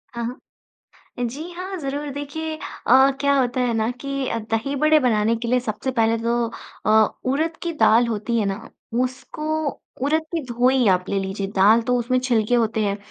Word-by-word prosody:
हाँ, 235 - -3
हाँ। 245 +2 -6 0.9
जी 305 +9 -6
हाँ, 370 +2 -6
ज़रूर 285 0 -4
देखिए 310 +3 -5 0.3
अ, 265 +3 +6
क्या 280 0 +3
होता 250 0 0
है 245 -1 +1
ना 220 +1 0
कि 275 -1 -3 0.2
दही 225 +6 -1
बड़े 305 +2 +4
बनाने 225 -2 +2
के 235 +1 -4
लिए 250 0 +3
सबसे 240 +3 -3
पहले 230 -2 +2
तो 235 0 +1 0.4
अ, - - +3 0.4
उरद 320 +3 -1
की 340 -1 -2
दाल 235 -6 +4
होती 230 +1 -1
है 210 - +1
ना 200 +4 -4 0.3
उसको 305 +4 -3 0.2
उरद 310 +3 +2
की 325 - 0
धोई 250 0 +2
आप 180 -1 +3
ले 200 - 0
लीजिए, 195 +1 -3
दाल 210 +4 +6
तो 250 +2 0
उसमें 255 +2 +1
छिलके 245 -2 +1
होते 225 -2 +1
हैं। 200 0 0
250 Hz, 185 wpm, -22 LUFS, 225-285 Hz, 0.9 s, अ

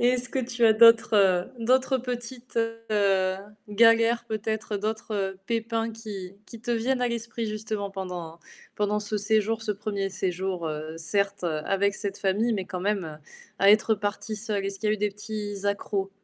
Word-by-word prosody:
Et 240 - +5
est-ce 250 0 0
que 265 - -1
tu 240 -1 0
as 220 - +7
d'autres, 230 0 +6
heu, 185 -3 +4
d'autres 260 +2 +3
petites, 245 0 -6 0.3
heu, 195 -3 +2 0.3
galères 230 +2 +4
peut-être, 220 -1 -3
d'autres 205 -2 -2
pépins 230 0 -1
qui 205 -4 -7
qui 230 - -11
te 240 +1 -2
viennent 250 +3 0
à 250 - +2
l'esprit 235 -1 -3
justement 215 -1 -3
pendant 180 -4 -6 0.3
pendant 210 0 0
ce 210 +1 -3
séjour, 220 +1 +1
ce 220 - -2
1er 200 -1 -2
séjour, 185 -2 -2
heu, 155 +1 -4
certes, 200 +2 -1
avec 195 +5 0
cette 200 -1 -4
famille, 210 +5 +1
mais 195 -4 -1
quand 185 -1 -5
même, 180 -6 -2 0.4
à 195 +1 +7
être 215 +1 +5
partie 205 +2 -3
seule? 210 -2 -2
Est-ce 195 0 -5
qu'il 215 - 0
y - - +3
a - - +3
eu - - -4
des 210 0 +1
petits 210 -1 -6
accros? 200 -1 -1
210 Hz, 175 wpm, -26 LUFS, 195-230 Hz, 0.4 s, as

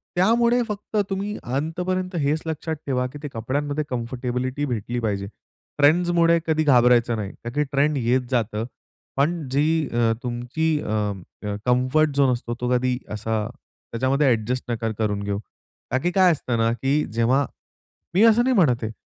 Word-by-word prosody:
त्यामुळे 235 +6 +3
फक्त 210 0 -4
तुम्ही 200 +2 -3
अंतपर्यंत 180 +8 -2
हेच 145 +3 +1
लक्षात 160 0 -3
ठेवा, 125 -2 0
की 145 +3 -10
ते - - -3
कपड्यांमध्ये 145 +6 -2
कम्फर्टेबिलिटी 125 +2 -2
भेटली 120 -2 -3
पाहिजे. 100 -4 -2 0.5
ट्रेंड्समुळे 170 +3 +4
कधी 155 -1 +2
घाबरायचं 125 -4 +4
नाही, 100 -2 -4
का 120 - -4
की 150 - +2
ट्रेंड 145 +1 +2
येत 125 +1 +2
जातं 115 -2 0 0.5
पण 155 +2 0
जी 150 +2 +2
अ, 115 -1 +2
तुमची 125 +6 -1
अ, - - -7 0.6
अं, 105 0 -2
कम्फर्ट 130 +4 +2
झोन 140 -2 +4
असतो, 120 -1 -4
तो 125 - 0
कधी 125 0 0 0.2
असा 110 0 -2 0.4
त्याच्यामध्ये 130 +5 +1
ॲडजस्ट 125 +1 0
नका 115 -1 -2
करून 105 -2 -1
घेऊ. 100 0 -2 0.5
का - - +2
की 175 - +1
काय 185 -1 +5
असतं 125 -6 -1
ना, 115 0 +2
की 135 +6 +1
जेव्हा 125 +5 +2 0.7
मी 190 +5 +4
असं 230 +1 +6
नाही 260 0 +2
म्हणत 130 - +3
आहे. 110 - -2
135 Hz, 160 wpm, -23 LUFS, 120-160 Hz, 0.7 s, असं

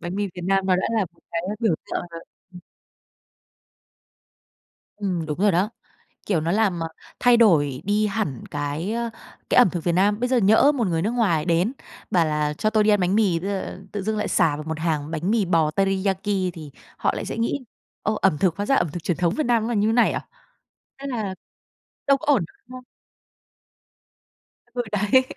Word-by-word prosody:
Bánh 175 +2 -5
mì 205 0 0
Việt 180 - -7
Nam 195 0 +1
nó 185 -1 +3
đã 185 - 0
là - - +3
một - - -28
cái 170 0 -2 0.2
biểu 220 -7 +2
tượng - - -3
rồi, 165 0 -8 0.3
ừm. 180 - -11 2.4
Ừm, 185 -5 -2
đúng 155 +2 -4
rồi 205 0 +4
đó. 185 +5 +1 0.6
Kiểu, 175 -6 +1
nó 165 +2 -1
làm 200 -4 +1 0.4
thay 245 -1 +5
đổi 145 - +3
đi 210 +1 +1
hẳn 200 - -3
cái, 145 +8 -3
ờ, 235 0 -2 0.4
cái - - +2
ẩm 245 - +7
thực 175 -2 -4
Việt 175 - +1
Nam. 200 +4 +2
Bây 250 +1 0
giờ 255 - +3
nhỡ 220 +7 +5
một 235 -7 0
người 165 -2 0
nước 215 - 0
ngoài 195 -11 +1
đến, 175 +8 +1 0.4
bảo 175 -3 +3
là 150 -1 0
"cho 215 +8 0
tôi 215 -1 +3
đi 215 - +3
ăn 205 -1 +4
bánh 185 +2 +1
mì", 195 -6 +2
ờ, 190 0 -4
tự 205 - -3
dưng 215 +1 -1
lại 210 - -1
sà 165 -6 +2
vào 150 - -6
một 160 0 -4
hàng 155 -2 -1
bánh 165 +5 -1
mì 220 -4 +2
bò 165 -3 +2
teriyaki 195 +1 0 0.3
thì 155 -4 -10 0.3
họ - - +1
lại - - -4
sẽ - - -5
nghĩ: 250 +3 -1 0.4
"Ơ, 215 - 0
ẩm 190 -6 +3
thực 175 -1 +1
hóa 205 +1 -3
ra 275 - +3
ẩm 175 - +2
thực 175 - -6
truyền 175 - -1
thống 175 -1 +1
Việt 310 - 0
Nam 235 -2 +2
nó - - -2
là 240 - -1
như 210 0 +2
thế 225 - +2
này 240 - +4
à?" - - -5 0.7
Thế 280 - -7
là, 220 -7 -3 0.7
đâu 275 - +5
có 295 - -9
ổn, 215 -11 +2 0.2
đúng 255 - -10
không? 255 - -12 1.9
Ừ, 245 - -1
đấy. 210 +5 +3
195 Hz, 215 wpm, -23 LUFS, 170-220 Hz, 2.4 s, ẩm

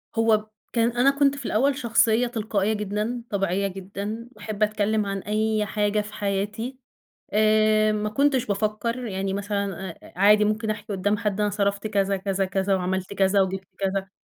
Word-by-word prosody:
هو 225 -2 +3 0.3
كان 230 0 +2
أنا 245 +3 +4
كنت 280 -1 +4
في 275 - -8
الأول 270 +7 +2
شخصية 235 -1 +3
تلقائية 215 -3 -1
جدًا، 210 +3 -2
طبيعية 195 -1 0
جدًا، 200 +4 -6
باحب 215 -1 -3
أتكلم 215 0 +1
عن 195 0 -2
أي 215 +1 0
حاجة 210 0 0
في 210 0 -10
حياتي 205 +6 -2 0.6
آآ، 215 0 +4
ما 210 0 -1
كنتش 275 +2 +2
بافكّر 215 +4 -1
يعني 195 -1 -2
مثلًا 200 -3 -3 0.2
عادي 210 +3 +5
ممكن 215 +1 0
أحكي 210 0 -4
قُدّام 205 +2 +1
حد 210 -3 -1
أنا 210 0 +2
صرفت 200 0 -1
كذا، 200 -2 +1
كذا، 195 0 -1
كذا 190 +1 0
وعملت 190 +1 -2
كذا 195 0 +3
وجِبت 190 0 -3
كذا. 195 0 -1
210 Hz, 160 wpm, -25 LUFS, 195-220 Hz, 0.6 s, عادي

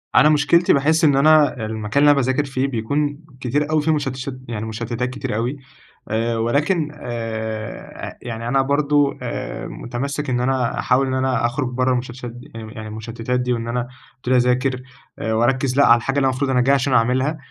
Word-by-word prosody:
أنا 150 - +7
مشكلتي 155 +3 +4
باحس 155 +4 +2
إن 145 -3 +5
أنا 145 -4 +4
المكان 110 +4 -1
اللي 145 - +7
أنا 145 - +3
باذاكر 130 +3 0
فيه 135 -1 -1
بيكون 140 +4 -1 0.2
كتير 145 +4 0
أوي 155 -1 +3
في 160 +2 +1
مشتشت 135 -3 -3
يعني 110 -2 -4
مشتتات 120 +2 -3
كتير 130 -4 -4
أوي. 120 +6 -2 0.5
آآ، 115 +1 0
ولكن 150 +8 +1
آآ، 110 -4 -5
أ - - -14
يعني 115 -1 -5
أنا 135 +2 +3
برضو 145 +1 +2
آآ، - - -5
مُتمَسك 140 +4 -4
إن 125 -1 +1
أنا 125 -1 0
أحاول 135 +2 +2
إن 130 - -2
أنا 130 -2 +1
أخرج 130 +3 -1
برّه 130 +1 +1
المشتشت 125 0 -3
دي، 120 +1 -9
يعني 115 -1 -6
م - - -10
أ - - -11
يعني 110 -1 -7
المشتتات 115 +3 -3
دي، 125 0 0
وإن 115 -1 -3
أبتدي 125 +1 -4
اذاكر 125 +1 +2 0.4
آآ، 110 - -1
واركّز 125 +3 +1
لأ 145 - +6
على 120 - +7
الحاجة 135 +4 -2
اللي 135 -1 +3
مفروض 130 +1 -1
أنا 125 -1 +3
جاي 135 +3 +4
عشان 135 0 0
أعملها، 130 +6 +2
130 Hz, 195 wpm, -21 LUFS, 120-140 Hz, 0.5 s, أنا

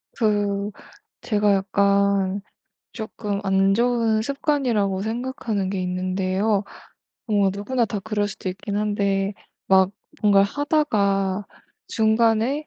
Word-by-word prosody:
그 205 -2 0 0.5
제가 210 -2 +2
약간 200 0 +2 0.5
쪼끔 210 -2 -4
안 195 0 +3
좋은 230 -1 +2
습관이라고 240 -7 0
생각하는 220 -3 -3
게 190 -1 -2
있는데요. 185 +3 0 0.6
뭐 205 -4 +2
누구나 235 +5 -1
다 210 -1 -3
그럴 205 0 -1
수도 205 -2 -6
있긴 200 +2 -4
한데 200 -1 0 0.3
막 190 -1 +4 0.3
뭔가 200 -2 +5
하다가 200 -7 0 0.4
중간에 225 +6 +2
205 Hz, 220 characters per minute, -23 LUFS, 195-220 Hz, 0.6 s, 뭔가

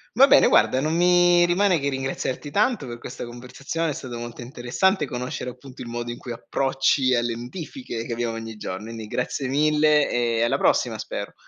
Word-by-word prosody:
Va 265 - +8
bene 275 - +6
guarda 130 - +4
non 155 +2 0
mi 175 0 +5
rimane 180 -1 +2
che 140 - -2
ringraziarti 135 +1 -3
tanto 205 - +1
per 120 - -6
questa 125 +1 -7
conversazione, 130 +7 -4
è - - -2
stato 125 -3 -7
molto 120 +1 -7
interessante 135 - 0
conoscere 125 0 -4
appunto 125 +1 -11
il - - -9
modo 120 0 -4
in 120 - -5
cui 120 - -8
approcci 135 +2 +1
alle 120 -1 0
notifiche, 125 - -6
che 120 - -4
abbiamo 115 -1 -2
ogni 115 -1 -6
giorno, 105 +2 -6
indi 115 -1 -7
grazie 125 +4 -3
mille 150 +1 +3
e 115 -1 0
alla 115 - +2
prossima - - +1
spero. - - -6
130 Hz, 190 wpm, -24 LUFS, 120-155 Hz, -, Va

